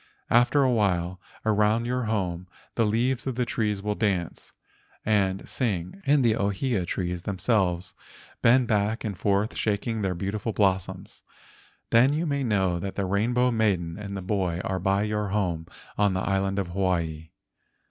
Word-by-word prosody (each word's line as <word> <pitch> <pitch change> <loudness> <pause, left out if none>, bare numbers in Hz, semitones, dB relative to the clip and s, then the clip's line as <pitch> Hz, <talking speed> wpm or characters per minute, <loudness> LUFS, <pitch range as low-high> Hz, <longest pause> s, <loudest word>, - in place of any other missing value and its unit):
After 120 +4 +4
a 130 - +3
while, 90 -5 0 0.2
around 110 +2 +2
your 125 0 -1
home 90 -5 -2 0.3
the 115 -2 +2
leaves 120 +4 0
of 130 - -2
the 125 0 0
trees 105 -4 -1
will 105 0 0
dance 95 -6 -2 0.5
and 95 -3 +1
sing 105 - -2
and 140 -2 +4
the 110 -2 +4
ohia 100 -1 -1
trees 90 -1 -2
themselves 95 -3 0 0.5
bend 120 +1 +5
back 105 +1 0
and 105 -4 -3
forth 100 +3 +1
shak¬ 105 -2 -1
ing 115 -2 -2
their 95 -2 -1
beautiful 100 +4 -3
blossoms. 95 -3 -1 0.7
Then 125 +5 +5
you 160 +3 0
may 140 -3 -1
know 95 -7 +1
that 95 +2 -5
the 100 - -1
Rainbow 120 +6 +2
Maiden 95 -6 0
and 100 -1 -5
the 95 - -6
boy 90 -3 -1
are 95 -1 -2
by 95 +2 +1
your 105 -1 -1
home 90 -5 -1 0.3
on 100 -2 +3
the 95 - 0
island 95 0 0
of 95 -3 -1
Hawaii. 85 -4 -1
100 Hz, 165 wpm, -26 LUFS, 95-115 Hz, 0.7 s, bend